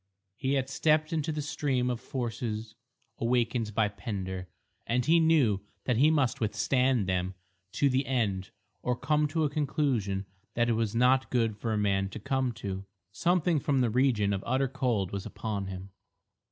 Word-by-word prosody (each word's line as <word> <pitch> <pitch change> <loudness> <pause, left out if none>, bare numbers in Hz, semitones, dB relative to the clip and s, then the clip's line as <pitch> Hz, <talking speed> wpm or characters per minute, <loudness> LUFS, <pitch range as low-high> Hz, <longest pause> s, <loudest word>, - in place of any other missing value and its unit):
He 135 +3 -1
had 130 -1 0
stepped 155 +3 +2
into 160 -1 0
the 150 -1 -3
stream 130 -4 0
of 120 - -4
forces 115 -3 -4 0.5
awakened 115 -2 0
by 110 -2 +3
Pender 95 -2 -5 0.4
and 125 +1 +1
he 165 +2 +5
knew 145 -12 +3 0.2
that 125 -3 +1
he 145 +5 +6
must 145 -7 +1
withstand 115 +2 +2
them 95 0 -1 0.4
to 140 - +3
the 130 +1 +1
end 100 -8 0 0.3
or 125 - 0
come 150 +4 +1
to 160 +2 0
a 150 - +2
conclusion 135 -10 0 0.3
that 120 0 +2
it - - +3
was 115 -1 -1
not 130 +2 +3
good 115 -4 +1
for 110 +2 -3
a 110 - +1
man 95 -2 +1
to 110 - -7
come 130 +3 0
to. 100 -3 -5 0.3
Something 175 - +2
from 135 -1 +1
the 120 -3 +2
region 115 -5 +2
of 95 - -2
utter 130 +3 +1
cold 120 -8 -1
was 100 -1 -4
upon 100 -3 -4
him. 95 0 -7
120 Hz, 175 wpm, -29 LUFS, 105-135 Hz, 0.5 s, he